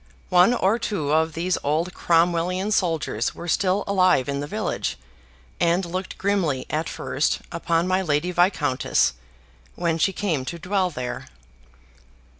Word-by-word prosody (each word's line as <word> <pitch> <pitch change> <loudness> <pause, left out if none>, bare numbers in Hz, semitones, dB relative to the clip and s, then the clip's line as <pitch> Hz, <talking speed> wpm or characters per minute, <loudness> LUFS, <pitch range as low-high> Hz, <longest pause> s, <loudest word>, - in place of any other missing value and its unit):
One 180 +7 +5
or 215 +2 +2
two 175 -11 -2
of 160 +1 +2
these 175 +3 -1
old 160 +5 0
Cromwellian 175 +3 +1
soldiers 165 - 0
were 170 - -8
still 185 +3 +1
alive 185 -9 +3
in 140 0 -2
the 145 - -4
village, - - -2 0.6
and 175 +2 +2
looked 185 +2 -5
grimly 190 -9 0
at 155 +2 -1
first 145 - -1
upon 170 0 0
my 185 +1 +2
Lady 160 0 0
Viscountess, 170 - +2 0.6
when 165 -2 -1
she 195 - +3
came 175 -8 -1
to 170 - -5
dwell 185 +2 0
there. 125 -6 -5
170 Hz, 140 wpm, -23 LUFS, 155-185 Hz, 0.6 s, One